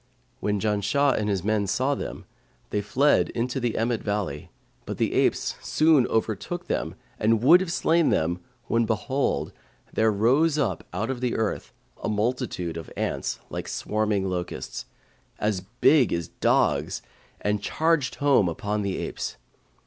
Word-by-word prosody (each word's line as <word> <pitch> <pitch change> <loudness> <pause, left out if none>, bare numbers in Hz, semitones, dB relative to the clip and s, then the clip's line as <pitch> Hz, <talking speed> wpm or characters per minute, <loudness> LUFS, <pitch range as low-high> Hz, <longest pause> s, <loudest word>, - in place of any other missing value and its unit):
When 105 -1 0
Janshah 105 +7 +2
and 105 0 -1
his 95 -3 0
men 105 -1 +1
saw 130 +8 +1
them, - - -6 0.5
they 105 - 0
fled 140 +8 +3
into 125 +3 -1
the 120 -3 -1
Emmet 115 0 0
valley; 100 -8 -3 0.4
but - - -4
the - - 0
apes - - +2
soon 155 -5 +4
overtook 115 - -2
them 80 - -2 0.2
and 110 +1 +2
would 170 +7 +8
have 185 -3 -2
slain 170 -1 +3
them, 85 +3 +1 0.3
when 115 0 +2
behold, 120 +5 -1 0.4
there 110 0 +3
rose 135 +10 +3
out 145 - 0
of 115 +7 -3
the 125 -2 0
earth 110 -2 -2 0.3
a - - 0
multitude 105 -6 -1
of 80 - -7
ants - - -2
like - - -4
swarming 105 -2 -1
locusts, 90 -1 -4 0.5
as 105 -3 0 0.2
big 145 -6 +5
as 85 0 -2
dogs, - - +1 0.4
and 105 0 0
charged 160 +1 +1
home 140 -10 +3
upon 105 +5 -2
the 100 -2 -2
apes. - - -4
110 Hz, 150 wpm, -26 LUFS, 100-135 Hz, 0.5 s, would